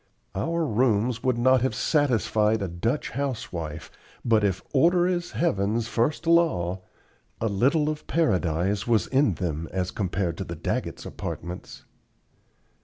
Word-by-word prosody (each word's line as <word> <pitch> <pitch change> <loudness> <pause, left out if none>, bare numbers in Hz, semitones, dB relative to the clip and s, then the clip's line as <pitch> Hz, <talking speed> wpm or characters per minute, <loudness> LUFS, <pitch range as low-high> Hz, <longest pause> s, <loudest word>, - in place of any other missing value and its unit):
Our 165 - -1
rooms 115 -1 +1
would 130 -2 +1
not 130 +1 +4
have 130 -3 0
satisfied 110 -6 +2
a - - -1
Dutch 110 - -2
housewife, 90 - -4 0.3
but 110 -3 +3
if 95 -2 0
"order 175 +5 +4
is 180 -1 -1
heaven's 110 - 0
first 120 +9 0
law" 150 - +2 0.6
a 115 - 0
little 135 +9 +2
of 155 0 -4
Paradise 95 - +1
was 110 -5 +3
in 135 - +2
them 80 -1 -3
as 90 -1 -2
compared 95 -3 -2
to - - -1
the - - -6
Daggetts' - - -3
apartments. 90 +1 -7
115 Hz, 135 wpm, -26 LUFS, 95-140 Hz, 0.6 s, not